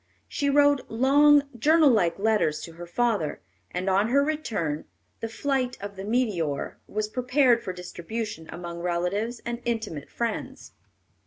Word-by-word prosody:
She 285 -2 -1
wrote 285 0 +3
long, 285 +5 +5
journal 305 +4 +5
like 180 -8 +2
letters 205 -7 +1
to 165 - -8
her 170 +1 -10
father, 205 -6 0 0.3
and 180 +2 -4
on 195 +3 +3
her 280 +4 +3
return 230 - -2 0.3
The 225 - -3
Flight 255 +1 -1
of 200 0 -7
the 190 - -7
Meteor 200 - -1
was 215 0 -2
prepared 250 +1 +2
for 195 - -4
distribution 180 0 -6
among 170 -1 -6
relatives 180 +7 -1
and 235 0 -4
intimate 220 - -3
friends. 235 -2 -4
220 Hz, 145 wpm, -26 LUFS, 180-255 Hz, 0.3 s, long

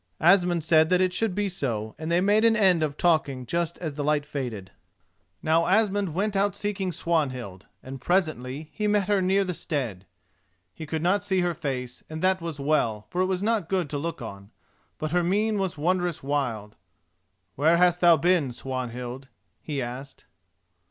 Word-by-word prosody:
Asmund 175 0 +4
said 160 0 +4
that 180 0 +3
it 185 -1 +2
should 215 -2 -1
be 205 0 0
so, 115 - -3
and 160 +1 -4
they 175 +1 +3
made 205 +3 +3
an 230 -1 +5
end 190 -6 +4
of 150 -2 -1
talking 145 -7 +1
just 170 +4 -2
as 160 -4 -4
the 145 0 -4
light 150 0 +1
faded. 120 -10 -5 0.7
Now 165 +2 +3
Asmund 200 -3 +2
went 205 +2 0
out 200 0 +1
seeking 195 -3 -2
Swanhild, 130 - -2 0.2
and 130 0 -8
presently 155 -5 -1
he 210 - -1
met 205 -2 +2
her 205 -2 +2
near 190 +2 +2
the 180 -1 -3
stead. 120 - -4 0.7
He 155 - -8
could 160 +1 -3
not 200 +3 +2
see 190 -2 +1
her 175 -1 0
face, 125 -5 -5
and 160 +1 -6
that 185 -1 +2
was 165 -3 -5
well, 125 -8 0
for 180 - 0
it 185 - +2
was 190 0 -1
not 215 -6 0
good 185 -6 -1
to 145 - -2
look 165 -4 -4
on, 100 -2 -9 0.5
but 155 -1 -3
her 180 +1 +2
mien 205 +4 +1
was 190 -4 -2
wondrous 175 0 0
wild. 125 -7 -2 0.8
"Where 160 - +3
hast 180 0 +4
thou 170 -2 +6
been, 170 -7 +2
Swanhild?" 125 0 -5 0.3
he 145 -4 -3
asked. 130 +3 -8
165 Hz, 185 wpm, -26 LUFS, 135-185 Hz, 0.8 s, thou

